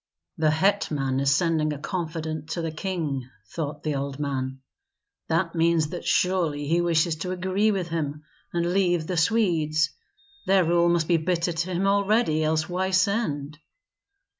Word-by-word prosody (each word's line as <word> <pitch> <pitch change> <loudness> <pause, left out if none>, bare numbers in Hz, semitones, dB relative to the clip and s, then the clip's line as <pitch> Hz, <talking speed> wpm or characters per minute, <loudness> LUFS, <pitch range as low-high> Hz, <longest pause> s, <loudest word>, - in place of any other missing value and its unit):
"The 155 -1 +2
hetman 155 -6 +1
is 140 0 +2
sending 155 +1 +2
a 150 - -4
confidant 160 -1 -4
to 170 - -3
the 165 - -2
king," 155 -7 -3 0.2
thought 150 -2 -4
the 155 - -1
old 140 0 -3
man; 135 -2 -3 0.7
"that 165 +1 0
means 165 -2 +2
that 175 - -6
surely 170 -6 +1
he 170 +3 +2
wishes 170 -1 +2
to 180 +3 -4
agree 185 +3 +1
with 190 -5 -1
him 150 -2 -3 0.3
and 175 0 0
leave 175 -4 +2
the 180 - -3
Swedes. 160 -5 +2 0.6
Their 190 -2 +4
rule 170 +1 +3
must 170 -2 +1
be 170 - +4
bitter 175 +1 0
to 170 +3 -2
him 190 +3 0
already, 200 -4 +2
else 155 0 +1
why 185 +1 -1
send?" 185 -7 0
165 Hz, 160 wpm, -25 LUFS, 155-180 Hz, 0.7 s, Their